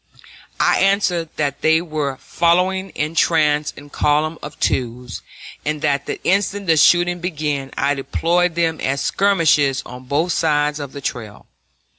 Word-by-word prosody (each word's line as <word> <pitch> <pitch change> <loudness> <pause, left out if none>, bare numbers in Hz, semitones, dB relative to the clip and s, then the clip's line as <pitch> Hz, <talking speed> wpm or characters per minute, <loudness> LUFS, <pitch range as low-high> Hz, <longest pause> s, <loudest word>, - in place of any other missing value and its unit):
I - - +3
answered 190 -4 +1
that 145 -2 -2
they 160 0 +4
were 155 -5 -3
following 180 +5 +1
in 150 +2 -2
trace 150 -3 +2
in 145 0 -13
column 155 +2 0
of 150 -1 -9
twos, 125 -1 -2 0.4
and 150 0 -3
that 140 -2 0
the - - -4
instant 200 +1 0
the 165 -3 +3
shooting 175 +2 +4
began 150 -6 -3
I 145 - +1
deployed 165 +5 0
them 165 -2 0
as 135 +1 -1
skirmishers 160 -9 +2
on 125 +1 -10
both 155 +7 0
sides 150 -2 +1
of 140 -2 -7
the 140 - -8
trail. 110 -6 -6
155 Hz, 150 wpm, -19 LUFS, 140-175 Hz, 0.4 s, they